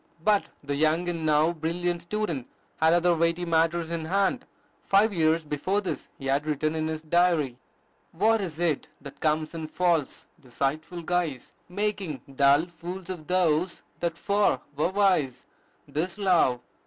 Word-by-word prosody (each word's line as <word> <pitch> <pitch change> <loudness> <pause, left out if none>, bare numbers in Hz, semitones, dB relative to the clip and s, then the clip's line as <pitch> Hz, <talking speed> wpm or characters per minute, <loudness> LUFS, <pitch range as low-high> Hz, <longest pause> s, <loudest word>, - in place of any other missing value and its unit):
But 210 0 +3 0.2
the 145 0 -3
young 155 +4 +2
and 165 -2 -2
now 155 +2 +3
brilliant 175 +2 -2
student 170 - -3 0.3
had 160 +1 +4
other 175 0 +3
weighty 170 +2 +1
matters 165 0 +1
in 165 -2 -3
hand. 200 +9 +1 0.4
Five 205 +2 +3
years 160 -1 +2
before 150 +7 -1
this, 195 -3 -5
he 135 - -9
had 140 +3 0
written 155 +1 0
in 155 0 -1
his 160 0 -4
diary: 160 -6 +2 0.5
"What 215 +6 +2
is't 170 -4 -1
that 140 -1 -11
comes 155 0 0
in 160 -2 -5
false, 170 -3 0
deceitful 150 +6 -3
guise, 165 -7 -2 0.2
Making 195 -6 -2 0.2
dull 140 +3 +5
fools 175 +2 -7
of 165 -4 -8
those 180 -1 +1 0.2
that 170 -1 -2
'fore 200 +3 +1
were 150 +4 +1
wise? 185 -10 +1 0.5
'Tis 175 +5 -2
love. 175 -11 +3
165 Hz, 150 wpm, -27 LUFS, 155-180 Hz, 0.5 s, dull